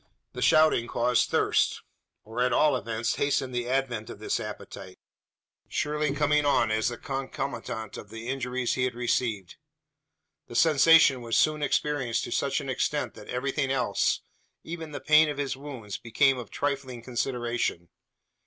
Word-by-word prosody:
The - - -6
shouting 155 -7 +4
caused 120 +1 +1
thirst; - - +1 0.4
or 110 +3 -4
at 125 0 +2
all 150 +3 +4
events 115 0 -2
hastened 140 -2 0
the 120 0 -2
advent 125 -5 -1
of - - -8
this 110 - -2
appetite 100 -3 -8 0.7
surely 150 0 -1
coming 150 0 +2
on 140 -6 +2
as 110 0 +1
the 120 - -6
concomitant 135 -5 -5
of 100 - -10
the 115 +2 -8
injuries 125 -1 -1
he 125 - 0
had 125 -1 -3
received. 115 -6 -1 0.9
The 120 - -10
sensation 155 -2 +6
was 115 -1 0
soon 155 -1 +2
experienced 145 -5 0
to - - -6
such - - 0
an - - -7
extent - - -1
that - - -13
everything 135 +2 -1
else 135 -1 +1 0.4
even 165 -1 -7
the - - -6
pain 155 0 +5
of 145 - -4
his 140 -2 -2
wounds 130 -7 -7
became 125 +3 +2
of 120 - -8
trifling 135 -4 -3
consideration. 120 -8 -2
125 Hz, 155 wpm, -27 LUFS, 115-145 Hz, 0.9 s, sensation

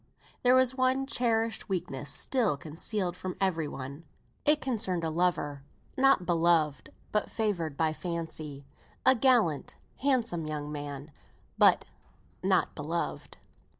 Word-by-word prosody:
There 250 0 +5
was 260 -1 +4
one 260 +1 +1
cherished 230 -5 0
weakness 165 -7 -3
still 220 - +1
concealed 175 +5 -3
from 185 0 -5
every 165 -5 0
one. 140 +3 -7 0.4
It 300 +1 +4
concerned 210 -9 -1
a 160 - -1
lover, 155 -4 0 0.3
not 270 -8 +4
beloved, 165 -4 +2 0.2
but 210 - 0
favoured 175 -10 -1
by 160 -1 +1
fancy. 160 -4 -5 0.4
A 260 - +8
gallant, 235 - +2 0.2
handsome 235 - 0
young 150 -1 -4
man; 145 0 -6 0.4
but - - +5 0.6
not - - +2
beloved. - - -4
175 Hz, 120 wpm, -29 LUFS, 155-230 Hz, 0.6 s, A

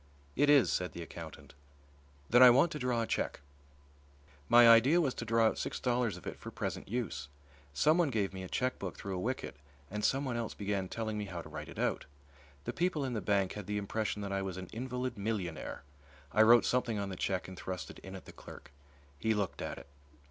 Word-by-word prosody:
"It 145 +2 +3
is," 145 -3 +6
said 90 0 -1
the 85 - -6
accountant. 85 -1 -10 0.7
"Then 120 +2 +5
I 125 - +11
want 135 +8 +5
to 150 - -4
draw 125 -2 0
a - - -1
cheque." - - -2 1.1
My 120 0 +8
idea 120 +9 +7
was 140 -7 +1
to 115 - -6
draw 115 0 +3
out 110 - +1
six - - -3
dollars 120 -6 0
of 90 - -13
it - - -6
for - - -7
present - - -4
use. 95 - -3 0.4
Someone 155 - +3
gave 105 -6 -1
me 95 - -6
a 95 - -7
chequebook 125 -8 -2
through 100 -1 -5
a - - -3
wicket 125 - -3 0.3
and 105 +1 -3
someone 130 0 +1
else 115 -2 -3
began 100 -2 -2
telling 110 -2 -3
me 105 - -3
how 90 -4 -6
to - - -11
write - - -7
it - - -11
out. - - -1 0.6
The - - -4
people 170 -5 0
in 130 - -3
the 110 - -2
bank 100 -1 +1
had 105 -3 -7
the 105 0 -1
impression 105 +1 -2
that 100 - -4
I 95 - 0
was 95 -2 -4
an 95 -1 -7
invalid 125 -1 -4
millionaire. 100 -10 -3 0.5
I 110 - +4
wrote 115 +1 +7
something 120 -3 +1
on 100 -1 -2
the 95 - -5
cheque 95 +1 -2
and 95 - -8
thrust 90 -1 -5
it - - -13
in 95 0 -9
at 95 - -10
the - - -11
clerk. - - -12 0.5
He 110 0 +1
looked 100 -3 -2
at - - -4
it. - - -10
110 Hz, 220 wpm, -32 LUFS, 95-125 Hz, 1.1 s, I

